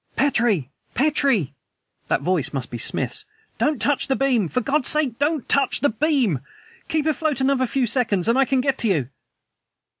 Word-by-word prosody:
"Petrie! 225 - +1 0.2
Petrie!" 270 - +1 0.5
(That - - 0
voice 180 -6 0
must 130 -4 -4
be 120 - -5
Smith's!) 430 - -1 0.4
"Don't 295 -4 +1
touch 285 +5 +2
the 270 - +1
beam! 255 -8 +1
For 250 - -1
God's 275 +2 0
sake 280 -6 +1
DON'T 295 -1 0
TOUCH 275 -2 +2
THE 285 - +3
BEAM! 260 - +1 0.5
Keep 310 -1 -1
afloat 310 -3 0
another 265 -1 +1
few 265 +1 0
seconds 225 -5 0
and 230 - +3
I 270 0 +3
can 265 0 +1
get 270 0 -1
to 230 - +2
you!" 150 - 0
260 Hz, 175 wpm, -22 LUFS, 210-285 Hz, 0.5 s, THE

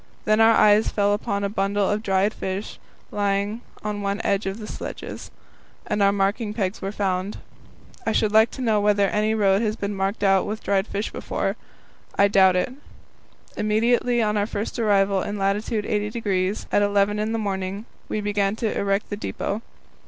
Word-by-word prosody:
Then 215 +1 +3
our 225 0 +6
eyes 210 +1 +5
fell 205 -1 +1
upon 200 -1 -2
a - - +1
bundle 200 0 0
of 210 +1 0
dried 195 0 +1
fish 190 +2 -5 0.3
lying 205 +2 -1 0.2
on 210 -1 -3
one 200 +1 -1
of 195 0 -1
the 220 - -7
sledges, - - -7 0.6
and 210 0 -1
our 200 0 +5
marking 205 +2 -1
pegs 195 -3 -2
were 195 - -3
found. 195 -1 -2 0.7
I 225 - 0
should 215 -1 +1
like 220 +1 +5
to - - -5
know 220 -3 +2
whether 205 -1 +3
any 215 +2 +1
road 200 -1 +3
has 215 -2 0
been 205 -2 -3
marked 195 +2 -2
out 195 -1 +3
with 215 +1 -4
dried 195 +1 +1
fish 205 +2 -3
before; - - -2 0.6
I 200 0 +5
doubt 190 -2 +5
it. 185 +7 0 0.8
Immediately 235 +3 +2
on 210 0 0
our 205 0 +1 0.3
arrival 200 -3 +3
in 205 +2 -4
lat. 195 0 +1
80° 210 -2 -1
at 205 - +3
eleven 205 0 +2
in 215 +1 -1
the 225 - 0
morning 195 0 -3 0.2
we 215 - -2
began 205 -1 0
to 220 -1 -2
erect 200 +1 -1
the 205 - -2
depot. 210 0 -3
205 Hz, 175 wpm, -23 LUFS, 195-215 Hz, 0.8 s, our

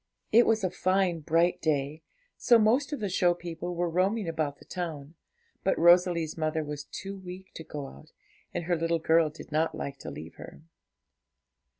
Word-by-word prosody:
It 235 +2 +6
was 220 -2 +2
a 185 - 0
fine, 185 -2 +1
bright 165 +3 +1
day, 150 0 -1 0.3
so 240 - +5
most 245 +7 +2
of 290 - -4
the 205 - 0
show 175 -1 +2
people 175 0 -6
were 175 +1 0
roaming 185 +4 0
about 155 -3 -2
the - - -17
town; 160 -4 -5 0.5
but 190 - +1
Rosalie's 175 -2 +4
mother 155 0 -1
was 145 -1 -6
too 195 +1 -7
weak 185 0 -10
to 160 - -8
go 145 -3 -6
out, 70 - -13 0.4
and - - -3
her 175 +1 +1
little 165 0 0
girl 160 0 +3
did 155 +1 -12
not 155 +2 +1
like 140 -1 -5
to - - -7
leave 80 +2 -9
her. - - -11
170 Hz, 185 wpm, -28 LUFS, 155-185 Hz, 0.5 s, It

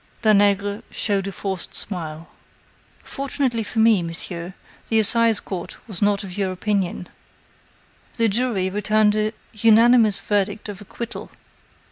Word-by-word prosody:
Danègre 205 -1 +3
showed 200 -2 -1
a - - -3
forced 190 -1 -5
smile. 165 -4 -5 0.8
"Fortunately 270 -4 -2
for 220 +1 -7
me, 220 -3 +5
monsieur, 170 +1 -4 0.3
the 225 - +2
Assizecourt 220 -4 +2
was 200 -6 -4
not 205 0 +2
of 185 -2 -8
your 195 -2 -1
opinion. 185 -2 -2 1.1
The 230 -1 +2
jury 220 -3 0
returned 210 +1 +2
an 215 0 0 0.2
unanimous 225 0 +5
verdict 205 +1 -1
of 205 0 -8
acquittal. 235 +3 -7
205 Hz, 120 wpm, -22 LUFS, 190-220 Hz, 1.1 s, me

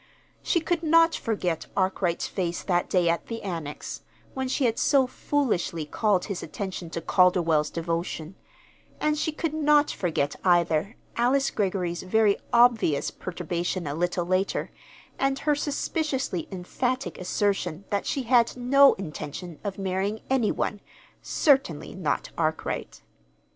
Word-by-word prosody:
She 345 - +1
could 335 +1 0
not 330 +1 +5
forget 180 -8 -2
Arkwright's 185 -2 0
face 175 -3 -3
that 175 -2 0
day 180 -2 +2
at 170 0 0
the 230 -1 -5
Annex, 165 -6 -5 0.3
when 265 0 -2
she 260 +1 0
had 230 -1 +1
so 275 -3 +4
foolishly 245 - -1
called 195 +4 +1
his 200 -4 -4
attention 190 -4 -5
to 165 - -4
Calderwell's 165 -4 +3
devotion; 165 0 -3 0.7
and 305 0 +1
she 305 +1 -1
could 310 0 -3
not 300 -1 +3
forget, 155 -5 -1
either, 175 +3 +2 0.2
Alice 265 +3 +2
Greggory's 185 -4 -1
very 205 +2 +3
obvious 235 -11 +4
perturbation 175 0 -3
a 140 - -3
little 175 +2 -1
later, 185 +2 0 0.5
and 270 0 +1
her 295 +1 +1
suspiciously 290 - -2
emphatic 245 +8 -3
assertion 185 -1 -1
that 200 - -1
she 270 - -1
had 240 0 +3
no 275 +3 +6
intention 165 -1 -7
of 200 -2 -4
marrying 195 +2 -2
any 250 -5 +3
one, 205 - -2 0.4
certainly 270 - +1
not 160 -7 -2
Arkwright. 160 -1 -2
195 Hz, 135 wpm, -26 LUFS, 175-255 Hz, 0.7 s, no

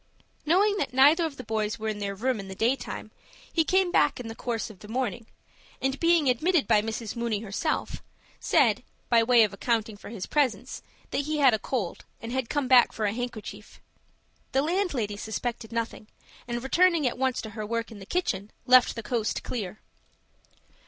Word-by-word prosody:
Knowing 405 +5 +4
that 255 - -2
neither 295 +6 +6
of 285 -3 -10
the 255 - -7
boys 215 -1 -2
were 220 0 -4
in 215 -1 -2
their 200 -1 -3
room 245 +3 -1
in 195 - -7
the 190 - -7
daytime, 240 +7 -1 0.4
he 330 - +3
came 370 +2 +2
back 295 - +3
in 235 -2 -6
the - - -5
course 230 -1 -3
of 195 - -16
the 210 - -12
morning, 240 -1 -3 0.5
and, 270 +1 -1
being 335 -3 +3
admitted 310 +6 +2
by 210 - +4
Mrs. 225 +1 -4
Mooney 235 -3 -1
herself, 225 +9 -2 0.4
said, - - +3 0.3
by 235 -1 +5
way 235 0 +6
of 210 -2 0
accounting 225 0 -1
for 205 - -11
his 210 -4 -5
presence, 255 -5 0 0.3
that 280 - -1
he 305 0 -1
had 270 -5 +5
a 220 - +1
cold, 205 -6 -3 0.2
and 230 - -7
had 260 -2 -2
come 290 -3 0
back 250 -1 +6
for 220 - -2
a 205 - 0
handkerchief. 245 -2 -7 0.7
The 270 - +3
landlady 300 - -1
suspected 225 +1 -4
nothing, 230 -2 -4 0.4
and, 240 0 -3
returning 335 +2 +3
at 245 0 -1
once 260 -1 +1
to 220 - -7
her 215 0 -5
work 230 +2 -3
in 215 - -10
the 195 - -11
kitchen, 215 - -1 0.2
left 255 0 +6
the 230 - -5
coast 220 0 -1
clear. 215 -4 -5
240 Hz, 195 wpm, -27 LUFS, 215-275 Hz, 0.7 s, neither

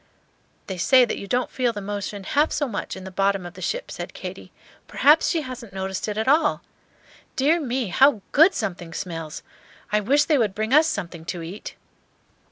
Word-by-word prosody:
"They 190 -2 -6
say 255 +7 +6
that 230 - -4
you 200 - -7
don't 250 +4 0
feel 245 -2 0
the 210 - -5
motion 200 0 -5
half 290 +10 +2
so 290 - 0
much 215 -5 -4
in 190 - -9
the 190 - -8
bottom 195 0 +1
of 175 - -8
the - - -12
ship," - - -3
said - - -7
Katy. - - -8 0.4
"Perhaps 300 +3 +4
she 330 - +1
hasn't 245 -6 -8
noticed 190 +1 -3
it 210 0 -3
at 220 - -1
all. 300 +2 +3 0.7
Dear 300 +6 +3
me, 255 - -2
how 255 +2 +4
good 325 +6 +6
something 175 -6 -4
smells! 165 -4 -5 0.5
I 210 - +3
wish 275 +8 +3
they 300 -3 +2
would 210 -5 0
bring 220 +3 -1
us 310 +2 +6
something 170 - -4
to 175 -1 -4
eat." 180 +6 -8
215 Hz, 195 wpm, -24 LUFS, 190-275 Hz, 0.7 s, say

